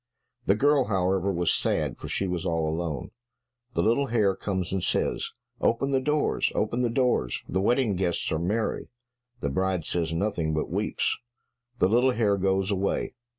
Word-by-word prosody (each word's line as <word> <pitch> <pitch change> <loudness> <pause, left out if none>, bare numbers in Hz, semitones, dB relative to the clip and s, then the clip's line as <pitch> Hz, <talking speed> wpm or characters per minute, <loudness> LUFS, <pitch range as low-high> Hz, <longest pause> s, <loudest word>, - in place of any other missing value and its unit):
The 100 - +5
girl, 140 +3 +3
however, 95 -1 +1
was 85 -2 +1
sad, - - 0
for - - -7
she 100 - -1
was 90 -3 -2
all 80 -1 0
alone. 80 -4 -3 0.6
The - - +2
little 120 +5 +2
hare 105 -5 +2
comes 95 -2 -3
and 95 -2 -1
says, - - 0 0.3
"Open 135 +4 +1
the 135 - +3
doors, 150 +3 +1
open 120 - 0
the 120 - +2
doors, 120 - +1
the 95 - 0
wedding 120 -1 +2
guests 90 -2 -1
are 80 - 0
merry." 105 +7 -1 0.5
The 70 - 0
bride 95 +2 0
says 85 -2 -1
nothing, 80 -3 -1
but 75 - -2
weeps. - - 0 0.6
The 90 - +4
little 125 +5 +3
hare 105 -3 +2
goes 95 +1 +1
away. 100 0 -1
95 Hz, 170 wpm, -27 LUFS, 85-115 Hz, 0.6 s, The